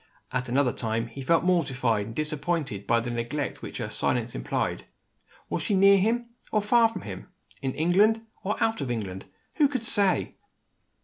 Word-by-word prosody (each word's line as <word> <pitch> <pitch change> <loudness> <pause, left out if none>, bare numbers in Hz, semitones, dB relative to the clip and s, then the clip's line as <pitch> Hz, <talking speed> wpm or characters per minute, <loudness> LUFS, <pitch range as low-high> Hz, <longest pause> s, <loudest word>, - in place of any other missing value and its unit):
At 125 0 -2
another 130 0 +2
time, 115 0 -2
he 135 +4 -8
felt 165 +5 +3
mortified 130 - +1
and 115 - -8
disappointed 150 - -2
by 115 0 +3
the 120 +1 -4
neglect 120 +5 -3
which - - -6
her - - -4
silence - - 0
implied. - - -2 0.6
Was - - -2
she 205 - 0
near 195 +1 +6
him, 230 +5 +1 0.3
or 215 -1 +2
far 230 +2 +5
from 225 - -7
him? 95 -2 -7 0.3
In 130 -1 -2
England, 205 +8 +3 0.2
or 205 +3 0
out 225 -7 0
of 135 - -3
England? 100 -6 -4 0.3
Who 295 - +5
could 260 -4 -3
say! 205 -4 +2
150 Hz, 175 wpm, -27 LUFS, -, 0.6 s, near